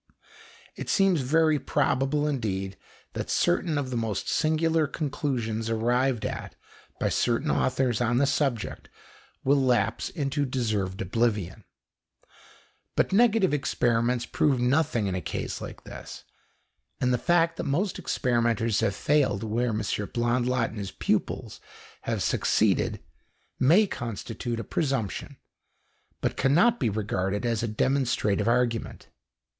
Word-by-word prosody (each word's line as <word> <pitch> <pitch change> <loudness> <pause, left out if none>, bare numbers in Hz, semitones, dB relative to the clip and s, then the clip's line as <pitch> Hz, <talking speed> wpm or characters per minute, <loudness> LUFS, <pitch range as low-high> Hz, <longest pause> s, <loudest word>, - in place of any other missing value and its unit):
It - - -6
seems 195 -6 +3
very 155 +3 +3
probable 145 +1 +1
indeed 100 -9 -2 0.4
that - - -4
certain 175 -3 +1
of 135 -3 -2
the - - -2
most 110 -4 -2
singular 160 0 +2
conclusions 125 -7 -2
arrived 120 +1 +1
at - - -5 0.4
by - - +1
certain 125 +6 +1
authors 130 -3 +1
on 120 0 +2
the 140 - +4
subject 135 -6 -1 0.5
will 140 +1 +3
lapse 115 -4 +1
into 145 -2 -1
deserved 110 -8 -2
oblivion. 105 -1 -1 1.3
But - - +1
negative 220 -5 +4
experiments 120 -3 +1
prove 140 -4 +1
nothing 125 -2 +1
in 95 - -1
a 90 - -2
case 80 - -4
like - - -8
this, - - -9 0.8
and 125 0 +2
the 125 - +1
fact 170 +1 +2
that - - -3
most 175 +8 -1
experimenters 115 -3 +1
have 100 - 0
failed 140 -9 +1
where 115 +3 0
M. 110 -1 -1
Blondlot 120 +4 0
and 110 - -7
his 100 -2 -4
pupils - - -2 0.5
have - - 0
succeeded - - +1 0.6
may 170 +12 +5
constitute 115 - -5
a - - -3
presumption, 135 - -2 0.8
but - - -1
cannot 200 - +3
be 115 - +1
regarded 100 0 -2
as 115 -2 0
a 115 - -1
demonstrative 110 -3 +1
argument. 120 -1 0
125 Hz, 130 wpm, -27 LUFS, 110-145 Hz, 1.3 s, may